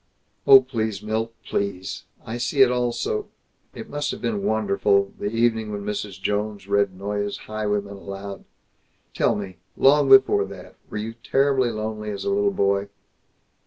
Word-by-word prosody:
"Oh, 135 -1 +10
please, 110 -6 -3
Milt, 110 +1 -2
please! 100 -2 -3 0.2
I 115 +2 -4
see 135 +3 +4
it 125 - +3
all 125 -1 +1
so 430 - -2 0.5
It 220 - -8
must 145 -5 -3
have - - -4
been 210 -3 -2
wonderful, 100 - +1
the - - -2
evening 115 -1 +1
when 100 -1 -5
Mrs. 105 -2 -4
Jones 105 0 -2
read 100 -2 +1
Noyes's 100 +1 -3
'Highwayman' 105 -2 -2
aloud. 100 0 -8 0.7
Tell - - +2
me 95 -3 -6 0.2
long 140 0 +5
before 130 -7 +6
that 95 -2 -11
were - - -5
you 110 +2 -4
terribly 130 +2 +1
lonely 110 -1 -4
as 100 -1 -5
a 200 - +1
little 200 0 +2
boy?" 100 - 0
110 Hz, 160 wpm, -23 LUFS, 100-125 Hz, 0.7 s, Oh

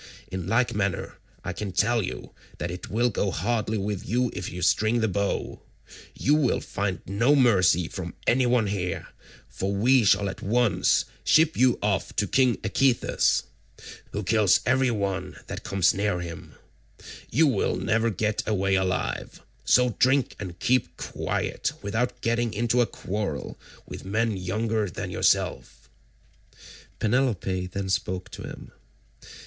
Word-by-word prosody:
In 95 -2 -4
like 120 +4 +2
manner 100 -3 -2 0.2
I 95 - -4
can 100 +1 -5
tell 115 +5 +2
you 95 - -6 0.3
that 85 - -3
it 90 +6 -7
will 120 +4 +1
go 100 - 0
hardly 110 +5 -1
with 100 -1 -3
you 125 +1 0
if 90 -1 -5
you 90 +1 -5
string 110 +5 +3
the 110 - +2
bow: 100 0 -2 0.5
you 145 - +2
will 150 -5 +2
find 95 -4 -3
no 115 +9 +3
mercy 95 - +4
from - - -7
any 125 +1 +3
one 120 -2 +3
here, 90 -4 -3 0.4
for 95 +1 -3
we 120 +5 +4
shall 100 0 +3
at 95 - -6
once 115 +2 +2 0.2
ship 160 +1 +4
you 125 -1 +3
off 100 -2 -1
to 105 - +1
king 125 +1 +3
Echetus, 125 +5 +2 0.7
who 105 - -3
kills 105 -1 +3
every 130 +1 +3
one 100 -4 -2
that - - -7
comes 95 -2 +2
near 100 -2 0
him: 85 -1 -8 0.7
you 160 +7 +4
will 140 - +1
never 115 +1 +1
get 105 +1 -1
away 100 -2 +1
alive, 95 -1 -1 0.3
so 125 0 +4
drink 130 +1 +3
and 90 -4 -6
keep 105 -7 0
quiet - - -2
without 115 +5 -2
getting 115 -1 0
into 120 +3 +2
a 120 - +2
quarrel 100 -6 -4 0.3
with - - -9
men 110 +3 0
younger 105 +3 -1
than - - -5
yourself." - - 0 1.1
Penelope 105 -6 0
then 95 +1 -4
spoke 95 -1 -2
to - - -8
him. - - -9
105 Hz, 150 wpm, -26 LUFS, 95-120 Hz, 1.1 s, mercy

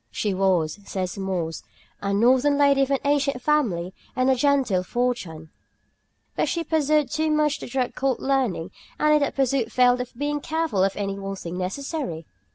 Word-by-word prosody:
She 205 - -2
was, 185 -3 +1
says 185 -2 -4
Mores, 185 -5 -3 0.4
a 200 - -1
northern 255 +7 +3
lady 280 -1 +4
of 270 - +1
an 275 - +2
ancient 280 -2 +1
family 225 - 0 0.2
and 255 +1 +3
a - - +3
genteel 260 -8 +2
fortune, 180 -8 -3 0.8
"but - - 0
she 335 - -1
pursued 305 -4 +1
too 315 0 0
much 300 -1 +1
the - - -7
drug 250 0 -1
called 265 -2 -1
learning, 260 -11 0 0.3
and 305 0 +4
in 300 - +5
that 285 - -1
pursuit 265 -3 +1
failed 250 0 +4
of 250 -1 -8
being 290 +2 -1
careful 320 - 0
of 195 0 +1
any 200 -1 -3
one 195 0 -4
thing 175 -2 -7
necessary. 185 - -4
250 Hz, 175 wpm, -24 LUFS, 195-285 Hz, 0.8 s, in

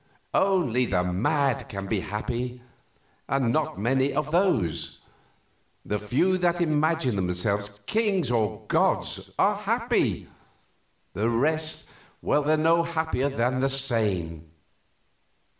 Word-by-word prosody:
Only 155 - +2
the 90 -2 +1
mad 120 - 0
can 100 -2 -5
be 100 +1 -1
happy, 120 +5 -4 0.7
and 130 -4 +1
not 155 0 -1
many 130 +5 +1
of 150 +1 -2
those. 110 - 0 0.8
The 105 - -2
few 175 - +1
that 175 -1 +1
imagine 155 -5 +1
themselves 100 +3 -1
kings 200 - +1
or 110 -2 -1
gods - - 0
are - - +3
happy, - - 0 0.9
the 110 +3 0
rest 155 +7 0 0.4
are 150 +1 +3
no 165 +2 +3
happier 160 -5 -1
than 130 -1 0
the 135 +1 +1
sane. 100 - 0
130 Hz, 110 wpm, -26 LUFS, 105-155 Hz, 0.9 s, are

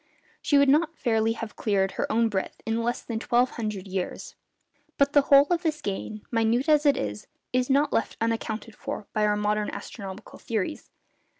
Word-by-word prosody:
She 290 - +3
would 280 0 +5
not 310 +4 +3
fairly 225 -2 +1
have 225 -1 -7
cleared 195 -3 +1
her - - -2
own 230 +1 +3
breadth 195 -3 -3
in 225 +1 0
less 240 +1 -2
than 230 -2 -4
twelve 245 +2 +2
hundred 210 -4 -4
years. 185 -1 -4 0.6
But 280 0 +3
the 285 - +7
whole 280 0 +6
of 345 -1 +2
this 315 -3 -1
gain, 205 +2 -5
minute 230 +4 +1
as 300 -1 +4
it 285 - +4
is, 105 0 -4 0.3
is 255 +1 +1
not 285 +2 +3
left - - 0
unaccounted 225 -1 -2
for 210 - -6
by 210 -1 +2
our 210 0 +1
modern 210 0 0
astronomical 200 0 -8
theories. 225 +6 -3
225 Hz, 185 wpm, -26 LUFS, 210-275 Hz, 0.6 s, the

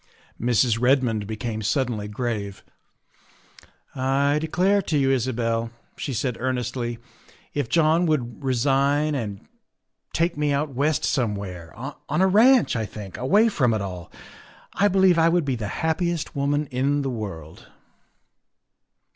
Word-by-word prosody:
Mrs. 120 0 +2
Redmond 125 -5 +2
became 110 0 -4
suddenly 110 -1 -1
grave. 105 -3 -4 0.8
" - - -26
I 140 +3 +1
declare 185 +6 +2
to 160 -5 -1
you, 135 -1 +2
Isabel," 115 -3 0 0.3
she 140 - -4
said 125 0 -2
earnestly, 125 -1 -2 0.3
" - - -28
if 145 -5 -2
John 165 +1 +3
would 140 -4 -2
resign 140 +3 +2
and 105 -8 -5 0.6
take 170 +1 0
me 150 -1 0
out 140 0 -1
West 145 +3 0
somewhere, 100 -8 -2
on 140 +7 -5
a 190 - +5
ranch, 225 - +5
I 110 -2 -2
think, 100 -2 -9
away 200 - +3
from 125 - +1
it 110 - -2
all, 90 -3 -7 0.6
I 205 - +3
believe 190 -3 +4
I 165 +1 +5
would 170 -2 +1
be 135 -2 0
the 110 -3 -4 0.2
happiest 170 0 -1
woman 145 +2 0
in 140 +3 0
the 135 - -2
world." 95 -9 -7
130 Hz, 140 wpm, -24 LUFS, 115-150 Hz, 0.8 s, a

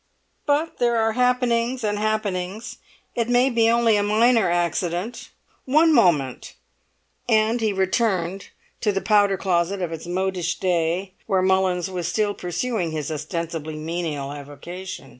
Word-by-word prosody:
"But 295 +3 0
there 240 -1 +2
are 225 0 +2
happenings 250 0 +1
and 205 -1 -1
happenings; 210 -1 -2 0.4
it 235 0 -1
may 245 +2 +3
be 230 -1 +3
only 230 -2 +3
a - - +2
minor 220 0 +3
accident. 175 +4 -2 0.4
One 310 +4 +4
moment!" 160 - +2 0.7
And 220 +1 +3
he 220 -2 +1
returned 190 -1 0 0.3
to 210 - +1
the 195 - -1
powder 205 -2 +3
closet 185 +1 0
of 175 -3 -3
its 165 +1 -7
modish 180 -1 -1
day, 180 +1 0
where 190 -1 +2
Mullins 190 -1 +1
was 175 -2 -3
still 205 +3 0
pursuing 180 +1 -2
his 155 -1 -4
ostensibly 155 0 -4
menial 155 -3 -4
avocation. 145 +2 -8
190 Hz, 140 wpm, -23 LUFS, 170-225 Hz, 0.7 s, One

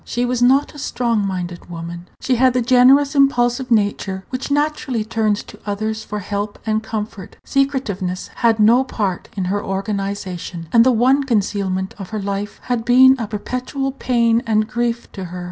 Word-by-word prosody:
She 245 +1 -2
was 245 0 -1
not 265 +4 +3
a 295 - -10
strong 235 -6 0
minded 180 -2 -5
woman. 170 +1 -7
She 255 -2 +1
had 255 +1 +4
the 250 - +1
generous, 260 +3 +5
impulsive 255 -3 +2
nature 200 -3 0
which 255 +2 -4
naturally 290 -5 0
turns 215 -2 0
to 210 - -14
others 215 +1 -3
for 210 - -5
help 205 +1 -4
and 220 -1 0
comfort. 215 -3 -6
Secretiveness 220 -10 -1
had 230 -2 +2
no 230 +5 +5
part 205 -8 -3
in 190 - -1
her 205 +3 -1
organization, 195 -3 -4
and 230 -1 +7
the 260 - +4
one 255 +4 +3
concealment 195 -5 -1
of 195 - -7
her 220 -1 -3
life 200 +1 -4
had 245 -2 -1
been 260 +3 +6
a 225 - -3
perpetual 255 +6 -3
pain 235 -3 +1
and 215 -1 +2
grief 235 +1 -2
to 190 -2 -6
her. 180 +1 -7
220 Hz, 175 wpm, -19 LUFS, 200-250 Hz, -, and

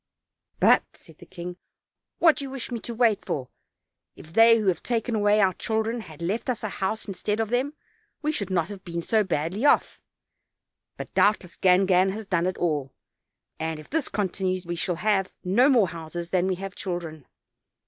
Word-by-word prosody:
"But," - - +6
said - - -17
the - - -14
king, 180 -1 -7 0.6
"what 325 -3 +5
do - - -4
you 275 - -5
wish 265 -2 -6
me 235 - -3
to 235 - -6
wait 225 -3 +2
for? 130 -3 -3 0.7
If 160 - -14
they 230 +2 +7
who 215 - -2
have 185 -3 +1
taken 235 0 -1
away 210 -1 +3
our 190 -2 +4
children 220 +4 -1
had 165 -5 -10
left 210 +9 -2
us 240 -3 -2
a 215 - -1
house 195 +4 -3
instead 210 +2 -2
of 220 -2 0
them, 265 +5 0 0.5
we 305 - +1
should 200 -11 -3
not 175 -2 0
have 200 -2 -9
been 170 -1 -4
so 220 +3 +2
badly 185 - -2
off; 290 - +3 1.0
but - - -8
doubtless 205 -4 +2
Gangan 185 0 +4
has 220 +1 -6
done 180 -2 +1
it 185 - -2
all; 145 -6 -1 0.6
and, 160 -1 -3
if 155 - -14
this 320 -1 -1
continue, 185 -2 -1
we 175 0 -3
shall 175 +1 -1
have 195 0 +1
no 235 +10 +4
more 230 -9 +4
houses 170 +1 -7
than 185 0 +2
we 190 - 0
have 195 +1 -6
children." 170 -7 -5
195 Hz, 190 wpm, -25 LUFS, 175-220 Hz, 1.0 s, they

